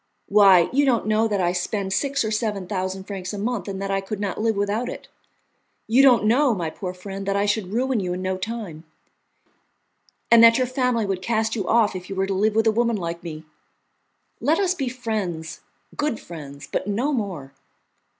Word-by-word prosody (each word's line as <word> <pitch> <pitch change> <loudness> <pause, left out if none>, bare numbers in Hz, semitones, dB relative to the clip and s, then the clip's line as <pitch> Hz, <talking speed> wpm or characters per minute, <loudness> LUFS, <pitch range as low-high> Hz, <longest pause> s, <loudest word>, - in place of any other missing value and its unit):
Why, 195 -4 +6
you 285 +2 +3
don't 250 -5 +2
know 215 +1 +2
that 205 -2 -1
I 175 -1 +2
spend 190 +2 -2
six 280 +2 0
or 215 - -2
seven 210 -3 -1
thousand 190 0 -3
francs 190 -1 -6
a - - -5
month, 215 -1 -2
and 195 -1 -4
that 195 0 -3
I 195 0 0
could 195 +1 -6
not 205 0 -3
live 225 -1 +1
without 205 +4 -1
it; - - -8 0.8
you 240 +4 +4
don't 250 -6 +5
know, 245 +2 +3
my 165 -4 -3
poor 185 +1 -5
friend, 195 +2 -7
that 200 - 0
I 200 +1 +2
should 205 -2 -1
ruin 250 +2 0
you 180 -2 -2
in 180 - -4
no 185 0 -1
time, 190 -6 -6 1.5
and 230 0 +8
that 230 0 +8
your 255 - +2
family 250 -3 0
would 195 -2 -2
cast 220 +2 0
you 200 -5 -3
off 225 -4 +3
if 180 -1 -7
you 195 - -5
were 190 0 +1
to 195 - -2
live 210 +3 +1
with 225 0 +3
a 220 - +5
woman 235 0 +1
like 170 -2 -4
me. 160 -3 -7 1.0
Let 315 +3 +2
us 375 -2 +2
be 275 -8 -3
friends, 205 -10 -4 0.4
good 295 -6 -1
friends, 145 -4 -10
but - - -3
no 240 +9 0
more. 180 - -4
205 Hz, 210 wpm, -23 LUFS, 185-230 Hz, 1.5 s, and